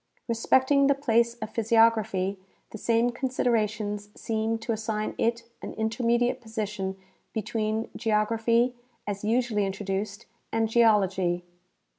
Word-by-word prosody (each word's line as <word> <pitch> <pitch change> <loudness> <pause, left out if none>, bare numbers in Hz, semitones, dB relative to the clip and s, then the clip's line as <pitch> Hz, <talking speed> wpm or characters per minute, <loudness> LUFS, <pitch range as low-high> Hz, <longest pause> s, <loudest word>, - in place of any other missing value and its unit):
Respecting 260 +4 +3
the 280 - +4
place 235 -4 +2
of 220 -2 -7
physiography, 220 -4 +2 0.3
the 220 - -8
same 230 +2 +2
considerations 220 -5 -1
seem 225 0 -1
to 225 +1 -4
assign 215 -1 -2
it 235 0 +1 0.2
an - - -6
intermediate 235 +2 +1
position 210 -4 -4 0.4
between 220 0 -1
geography, 230 +2 +2 0.3
as 200 -1 -4
usually 225 -1 +1
introduced, 200 +2 -3 0.3
and 225 0 +1
geology. 195 -6 +3
220 Hz, 110 wpm, -27 LUFS, 210-235 Hz, 0.4 s, the